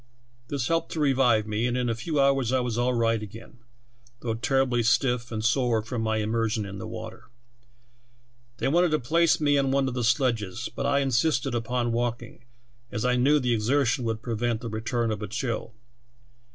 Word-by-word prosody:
This 135 -3 -2
helped 165 0 0
to 160 - -3
revive 130 -6 +3
me, 110 +2 -1
and 125 0 -1
in 125 -1 0
a 115 - +1
few 145 +7 -2
hours 135 -3 +3
I 130 - +2
was 125 -2 -2
all 120 +1 +1
right 115 -1 +1
again, 110 +3 -11 0.6
though 115 -2 -2
terribly 125 +1 +1
stiff 120 +1 +1
and 110 -1 -3
sore 120 -3 +2
from 115 +1 -4
my 110 0 0
immersion 110 0 -1
in 100 0 -7
the - - -6
water. - - -9 1.3
They - - -1
wanted 175 +5 +3
to 155 0 +1
place 165 +6 +2
me 145 -2 +3
on 135 -1 +1
one 135 0 +2
of 130 - -3
the 125 -1 -2
sledges, 115 -4 0
but 140 - -1
I 140 0 +2
insisted 135 0 +1
upon 120 +1 -1
walking, 120 0 -3 0.5
as 110 - -2
I 125 0 +3
knew 140 +4 +4
the 125 -3 +1
exertion 125 +3 +1
would 115 -1 -3
prevent 115 -1 -1
the 115 - -5
return 115 +1 -1
of 105 -1 -4
a 105 - -4
chill. 115 0 -4
120 Hz, 190 wpm, -26 LUFS, 115-135 Hz, 1.3 s, knew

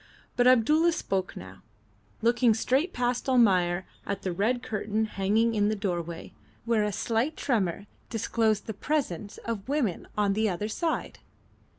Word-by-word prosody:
But 245 0 +4
Abdulla 300 +8 +5
spoke 190 -10 -2
now, 95 +1 -10 0.6
looking 235 -1 +4
straight 265 - +1
past 245 +1 -1
Almayer 185 -8 +3 0.2
at 200 - -4
the 185 - -1
red 230 +7 0
curtain 215 +1 -1
hanging 215 +3 +1
in 205 -1 +2
the 215 - 0
doorway, 175 -5 -4 0.3
where 230 -2 +2
a 210 - 0
slight 230 +9 -1
tremor 200 - 0 0.2
disclosed 220 -1 0
the 220 - -4
presence 210 - -2
of 230 0 -4
women 265 - -1
on 205 -1 +2
the 215 +1 +1
other 200 +4 -3
side. 325 +9 -2
220 Hz, 150 wpm, -28 LUFS, 195-245 Hz, 0.6 s, Abdulla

